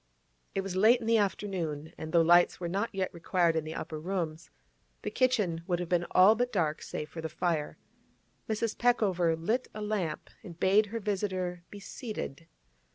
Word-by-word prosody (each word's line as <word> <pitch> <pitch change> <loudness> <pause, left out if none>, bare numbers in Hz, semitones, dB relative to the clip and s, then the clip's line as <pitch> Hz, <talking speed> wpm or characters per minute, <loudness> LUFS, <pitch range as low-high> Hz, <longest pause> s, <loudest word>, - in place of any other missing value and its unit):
It 195 - +1
was 195 -1 -5
late 220 +6 +5
in 230 - -7
the 225 0 +4
afternoon, 175 -7 -2
and 160 0 -7
though 170 0 +5
lights 175 +1 +5
were 175 - -3
not 200 +6 -1
yet 190 -2 -2
required 170 0 +1
in 160 -1 -1
the 155 - -6
upper 155 -1 -5
rooms, 165 -2 -3 0.5
the - - -3
kitchen 215 -11 +1
would 175 -2 +1
have 175 -1 -4
been 175 -1 +1
all 190 +4 +7
but 245 +2 -1
dark 160 -7 0
save 150 - -5
for 165 - -8
the 160 - -4
fire. 160 -2 -1 0.7
Mrs. 220 0 -1
Peckover 190 -9 +2
lit 220 +11 -1
a 215 - -5
lamp 195 -7 -3
and 170 -1 -11
bade 200 +4 +4
her 230 +3 -4
visitor 185 -4 -2
be 205 - -9
seated. 200 - -6
180 Hz, 185 wpm, -30 LUFS, 165-210 Hz, 0.7 s, all